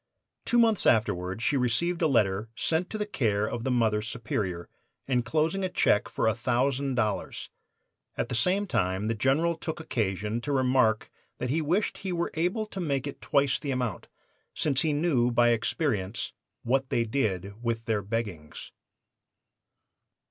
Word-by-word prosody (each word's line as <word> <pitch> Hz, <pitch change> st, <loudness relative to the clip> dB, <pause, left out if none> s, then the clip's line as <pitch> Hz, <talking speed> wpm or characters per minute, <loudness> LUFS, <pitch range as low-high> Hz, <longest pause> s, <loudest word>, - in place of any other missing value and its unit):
"Two 240 Hz, -, +2 dB
months 225 Hz, -3 st, +4 dB
afterward 105 Hz, -2 st, +1 dB
she 145 Hz, -, +2 dB
received 140 Hz, +8 st, +1 dB
a 160 Hz, -, +4 dB
letter 110 Hz, -5 st, +1 dB
sent 165 Hz, +3 st, 0 dB
to 215 Hz, -, -4 dB
the 210 Hz, -, -1 dB
care 105 Hz, -, 0 dB
of 115 Hz, 0 st, -4 dB
the 130 Hz, -, -1 dB
Mother 110 Hz, -4 st, +2 dB
Superior, 105 Hz, -6 st, -3 dB, 0.4 s
inclosing 155 Hz, +9 st, +1 dB
a 185 Hz, -, 0 dB
check 110 Hz, -10 st, +2 dB
for -, -, 0 dB
a 110 Hz, -, +4 dB
thousand 130 Hz, +4 st, 0 dB
dollars. 110 Hz, -4 st, -2 dB, 0.7 s
At -, -, -1 dB
the -, -, -5 dB
same 180 Hz, -, +2 dB
time 95 Hz, -, 0 dB
the -, -, +2 dB
General 140 Hz, +9 st, +2 dB
took 160 Hz, 0 st, -5 dB
occasion 105 Hz, -, -2 dB
to 145 Hz, -, -3 dB
remark 130 Hz, -5 st, +2 dB, 0.3 s
that 125 Hz, -, -2 dB
he 160 Hz, +3 st, +1 dB
wished 175 Hz, +8 st, 0 dB
he 190 Hz, -, -4 dB
were 170 Hz, -1 st, -1 dB
able 180 Hz, +7 st, 0 dB
to 205 Hz, -2 st, -8 dB
make 140 Hz, -6 st, -1 dB
it 140 Hz, -, -7 dB
twice 140 Hz, -2 st, +2 dB
the 145 Hz, -, -5 dB
amount, 125 Hz, -5 st, -2 dB, 0.5 s
since 140 Hz, -3 st, +1 dB
he 160 Hz, -, +1 dB
knew 145 Hz, -5 st, +2 dB
by 120 Hz, 0 st, +4 dB
experience 110 Hz, -, -1 dB, 0.3 s
'What 130 Hz, +2 st, +1 dB
they 120 Hz, -, +2 dB
did 105 Hz, -4 st, -2 dB
with 115 Hz, -1 st, -2 dB
their 110 Hz, -2 st, 0 dB
beggings. 100 Hz, -7 st, -5 dB
125 Hz, 160 wpm, -28 LUFS, 110-155 Hz, 0.7 s, months